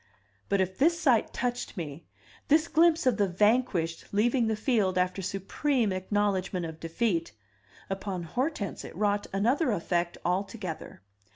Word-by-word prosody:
But 200 - +2
if 185 0 -2
this 335 +4 +4
sight 260 -9 +3
touched 245 -3 -3
me, 155 -2 -6 0.4
this 310 +2 +4
glimpse 330 -1 +4
of 255 -4 +3
the 205 - +3
vanquished 185 -4 +1
leaving 230 +3 +2
the 220 - +1
field 210 -5 +1
after 180 +1 0
supreme 200 - 0
acknowledgment 190 -2 0
of 160 -1 -7
defeat, 165 - -1 0.5
upon 195 -2 -4
Hortense 245 - -2
it - - -9
wrought 205 +1 0
another 245 - +2
effect 175 -2 -1
altogether. 185 - -3
200 Hz, 135 wpm, -28 LUFS, 180-245 Hz, 0.5 s, this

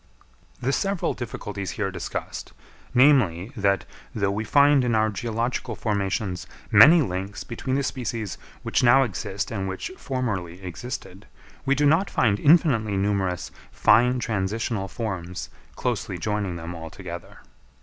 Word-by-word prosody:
The 130 - 0
several 195 +2 0
difficulties 105 -5 -5
here 100 -3 -1
discussed, 90 - -5 0.4
namely, 125 - +4
that, 100 -4 +1 0.3
though 100 -3 +1
we 105 +2 -2
find 140 +3 +5
in 120 -2 +1
our 110 0 +2
geological 115 +3 -2
formations 100 -3 -2 0.2
many 155 +10 +8
links 95 -1 -4
between 130 +2 -3
the 140 - +1
species 115 -6 -3 0.2
which - - +1
now 125 +2 +6
exist 100 -2 -3
and 95 -4 -2
which 95 - -5
formerly 105 -10 -3
existed, 95 +8 -7 0.4
we 140 - +4
do 145 +2 +2
not 160 +7 +3
find 105 -4 +2
infinitely 125 - +4
numerous 95 -2 -1 0.2
fine 125 +2 +4
transitional 110 -2 -2
forms 95 -6 -5 0.2
closely - - -2
joining 105 -4 -2
them 85 +1 -6
all 80 -1 -7
together. 85 -1 -9
110 Hz, 135 wpm, -25 LUFS, 95-125 Hz, 0.4 s, many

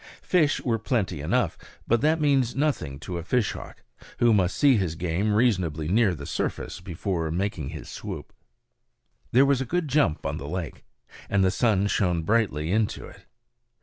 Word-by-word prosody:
Fish 155 -5 +2
were 115 -3 0
plenty 100 - -1
enough; 75 - 0 0.3
but 120 0 +2
that 155 +3 +3
means 135 -5 +2
nothing 135 - -1
to 85 +3 -4
a - - -6
fishhawk, 115 +4 -2 0.3
who 120 -1 +4
must 95 -3 +1
see 140 -3 +5
his 90 -7 -1
game 90 +5 -1
reasonably 95 -9 +1
near 100 0 +3
the 70 -2 -8
surface - - -3
before 85 -1 -3
making 85 -4 -2
his - - -8
swoop. - - -7 1.0
There 130 +3 +6
was 135 -2 +2
a - - +1
good 170 +5 -1
jump 135 - +1
on - - -2
the 70 - -6
lake, 90 -2 -5 0.4
and 100 -1 +2
the 95 - +3
sun 100 -2 +2
shone 90 -5 +1
brightly 90 -7 +1
into 110 +1 0
it. - - -15
100 Hz, 170 wpm, -26 LUFS, 85-125 Hz, 1.0 s, There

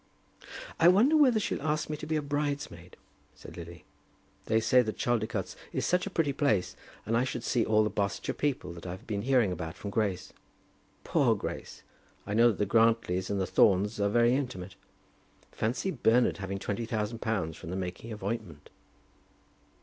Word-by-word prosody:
"I 165 - +6
wonder 220 - +5
whether 260 -7 +5
she'll 210 - -2
ask 150 0 -1
me 150 - -3
to 150 - -8
be 160 - 0
a 155 - 0
bridesmaid?" 145 - -3 0.4
said - - -12
Lily. 85 0 -10 0.6
"They 110 0 +3
say 125 +3 +4
that 110 -3 -4
Chaldicotes 110 -4 -1 0.2
is - - -2
such 180 +2 +1
a - - -2
pretty 160 -6 0
place, 110 -10 +1 0.3
and 115 - 0
I 120 - +3
should 120 -2 -4
see 120 -2 +1
all 110 0 +3
the 105 - -1
Barsetshire 100 0 -2
people 145 -10 -2
that 85 +1 -9
I've 90 +1 -7
been 100 -2 -3
hearing 125 -4 +2
about 80 -2 -5
from 100 - -6
Grace. 100 -4 -2 0.7
Poor - - +2
Grace! - - -6 0.4
I 100 - -4
know 115 +2 +6
that 110 -5 +1
the 105 - +1
Grantlys 110 -4 +2
and 100 - -1
the 95 - +1
Thornes 100 +3 +3
are 100 0 +2
very 120 +3 +4
intimate. 120 -10 -3 0.8
Fancy 120 - -1
Bernard 120 -4 +2
having 100 0 -4
twenty 105 +3 -3
thousand 110 0 -2
pounds 95 -10 -2
from 80 - -9
the 90 - -3
making 95 +4 -5
of 105 -2 -8
ointment!" 100 -8 -5
110 Hz, 180 wpm, -29 LUFS, 95-130 Hz, 0.8 s, I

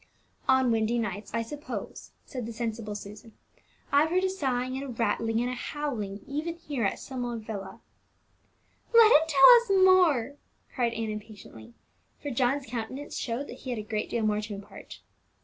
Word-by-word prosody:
"On 260 -2 +4
windy 225 +1 +1
nights, 205 -3 -4
I 230 +1 -1
suppose," 295 +6 -7 0.2
said 250 -5 -6
the 230 - -6
sensible 225 -2 -4
Susan. 210 +2 -10 0.6
"I've 290 +3 +4
heard 365 +2 +1
a 380 - +1
sighing, 255 -8 -1
and 270 - -4
a - - -6
rattling, 230 -1 0
and 245 - -1
a - - -3
howling 240 -7 -4
even 305 +4 -3
here 295 -7 -4
in - - -3
Summer 245 -3 -4
Villa." 215 -3 -7 1.1
"Let 455 -1 +8
him 315 -4 +6
tell 280 - +8
us 390 -5 +3
more!" 310 -8 +4 0.4
cried 240 -3 0
Ann 225 -1 -3
impatiently, 205 - -10 0.4
for 290 - -5
John's 260 +3 +1
countenance 255 +4 -6
showed 245 +4 -3
that - - -10
he 260 - -8
had 245 - -2
a 215 - -4
great 215 0 -3
deal 235 - -1
more 210 0 +1
to 210 -1 -6
impart. 200 +1 -11
240 Hz, 175 wpm, -28 LUFS, 220-285 Hz, 1.1 s, Let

